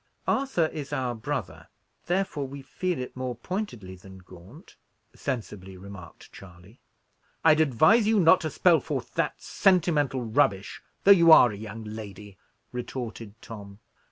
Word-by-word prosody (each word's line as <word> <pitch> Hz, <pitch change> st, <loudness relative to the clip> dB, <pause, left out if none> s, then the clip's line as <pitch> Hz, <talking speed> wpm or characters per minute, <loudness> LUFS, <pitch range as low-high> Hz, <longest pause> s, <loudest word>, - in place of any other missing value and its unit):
"Arthur 265 Hz, -11 st, +1 dB
is 150 Hz, -3 st, -6 dB
our 125 Hz, -2 st, -2 dB
brother, 110 Hz, -, -5 dB, 0.4 s
therefore 175 Hz, -6 st, -1 dB
we 140 Hz, +1 st, -9 dB
feel 180 Hz, +5 st, -3 dB
it 125 Hz, 0 st, -6 dB
more 130 Hz, -1 st, -4 dB
pointedly 120 Hz, -, -6 dB
than 95 Hz, +1 st, -14 dB
Gaunt," 95 Hz, -, -16 dB, 0.4 s
sensibly 105 Hz, -8 st, -6 dB
remarked 95 Hz, -3 st, -12 dB
Charley. 90 Hz, +4 st, -15 dB, 0.7 s
"I'd 160 Hz, -1 st, +6 dB
advise 160 Hz, -, +4 dB
you 220 Hz, -1 st, +3 dB
not 165 Hz, 0 st, +5 dB
to 160 Hz, -, -2 dB
spell 170 Hz, +2 st, +3 dB
forth -, -, -5 dB
that -, -, -1 dB
sentimental 155 Hz, -8 st, +1 dB
rubbish, 100 Hz, -3 st, 0 dB, 0.2 s
though 200 Hz, -, +7 dB
you 170 Hz, -4 st, +7 dB
are 125 Hz, -7 st, +8 dB
a -, -, -7 dB
young 110 Hz, +2 st, -8 dB
lady," 105 Hz, -2 st, -9 dB, 0.3 s
retorted 115 Hz, -3 st, -7 dB
Tom. 100 Hz, -3 st, -10 dB
125 Hz, 140 wpm, -26 LUFS, 100-160 Hz, 0.7 s, are